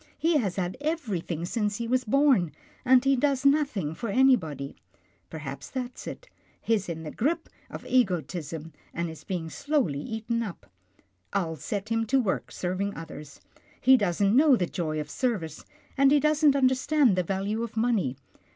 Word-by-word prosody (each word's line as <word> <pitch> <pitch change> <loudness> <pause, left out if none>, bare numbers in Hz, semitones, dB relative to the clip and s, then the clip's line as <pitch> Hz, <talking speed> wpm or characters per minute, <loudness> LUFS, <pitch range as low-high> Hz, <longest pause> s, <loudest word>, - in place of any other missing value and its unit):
He 325 0 +2
has 200 -10 -1
had 185 +2 -2
everything 205 - -2
since 210 +1 -1
he 235 - -3
was 255 +1 +1
born, 255 - +3 0.3
and 260 0 +5
he 275 0 +4
does 275 0 +1
nothing 275 - +2
for 230 +6 -5
any 265 +4 +6
body. 145 - -6 0.5
Perhaps 140 -3 -7
that's 255 -1 -6
it - - -8 0.2
— - - -35
he's 210 -5 0
in 160 -1 -5
the 155 - -6
grip 320 +7 -1 0.2
of - - -8
ego 215 -9 +3
tism 160 -1 -7 0.2
and 170 0 -2
is 160 - -12
being 180 -5 -3
slowly 255 - -1
eaten 225 +4 -3
up. 195 - -6 0.7
I'll 170 -5 0
set 200 +8 -4
him 225 0 0
to 270 +4 +3
work 215 -7 -1
serving 190 +3 -2
others. 150 -3 -9 0.4
He 260 +1 +6
doesn't 200 -1 +2
know 285 0 +6
the 185 - 0
joy 155 -3 -3
of 150 - -4
service, 195 - -2 0.3
and 275 0 +5
he 295 - +6
doesn't 300 -1 +4
understand 260 -2 +3
the 185 - +2
value 195 +5 -2
of 230 -1 -5
money. 220 - +1
215 Hz, 175 wpm, -27 LUFS, 170-260 Hz, 0.7 s, any